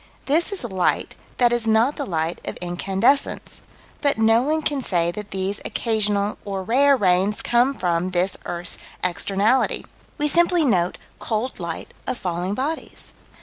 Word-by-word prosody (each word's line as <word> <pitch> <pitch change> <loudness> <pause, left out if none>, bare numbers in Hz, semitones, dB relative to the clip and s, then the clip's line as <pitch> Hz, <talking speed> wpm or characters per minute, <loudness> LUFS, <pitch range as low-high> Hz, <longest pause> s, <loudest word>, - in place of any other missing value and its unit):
This 320 +7 +2
is 400 - -3
light 190 -6 0 0.2
that 240 -1 +4
is 235 -2 0
not 225 +6 +3
the 285 - -4
light 165 -1 -2
of - - -4
incandescence, 195 +9 0 0.4
but 285 -4 +2
no 225 +1 +4
one 310 +4 0
can 285 -2 0
say 170 -7 +1
that 210 +3 -7
these 195 +1 -2
occasional, 210 -2 0
or 195 -2 -4
rare, 270 +6 +4
rains 190 0 +2
come 245 +3 +3
from 175 -2 0
this 185 +1 0
earth's 175 0 -2 0.2
externality. 200 +7 +1 0.3
We 295 -1 +1
simply 340 +1 +3
note 180 -8 +1 0.2
cold 225 +2 -2
light 170 -2 -5
of - - -1
falling 180 +1 -2
bodies. 295 +6 -3
210 Hz, 150 wpm, -23 LUFS, 185-265 Hz, 0.4 s, that